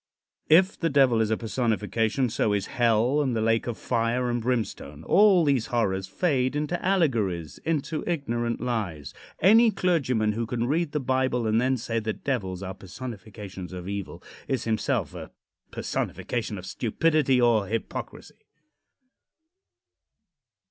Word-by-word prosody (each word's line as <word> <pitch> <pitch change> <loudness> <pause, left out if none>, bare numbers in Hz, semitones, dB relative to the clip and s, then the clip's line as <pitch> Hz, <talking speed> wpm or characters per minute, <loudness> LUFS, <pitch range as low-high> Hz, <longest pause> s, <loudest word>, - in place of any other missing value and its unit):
If 185 +5 +5
the 165 - +1
Devil 135 -5 +4
is 110 - +1
a 110 - +1
personification, 115 +1 0
so 105 -1 +1
is 100 -1 0
hell 120 +4 +2
and 130 -4 0
the - - 0
lake 115 +1 +1
of 120 - -3
fire 120 +1 0
and 120 0 -1
brimstone. 110 - -3
All 195 - +5
these 135 -5 +1
horrors 95 -5 0
fade 130 - 0
into 150 +4 -2
allegories; 115 - 0
into 155 -1 -1
ignorant 120 -8 -1
lies. 105 - -3 0.3
Any 225 +6 +6
clergyman 140 - +1
who 115 +2 -3
can 120 0 -1
read 155 +3 0
the 150 - 0
Bible 130 -2 0
and 110 +1 +2
then 130 +1 +1
say 115 -1 -2
that 110 -1 -5
devils 100 -9 -2
are 95 0 -5
personifications 100 -2 -8
of 90 0 -7
evil 100 -1 -5 0.2
is 130 -3 -1
himself 110 -2 -1
a - - -8 0.4
personification 115 -3 -3
of 90 - -8
stupidity 135 - +1
or 115 -5 +3
hypocrisy. 115 +2 -6
120 Hz, 140 wpm, -26 LUFS, 110-140 Hz, 0.4 s, Any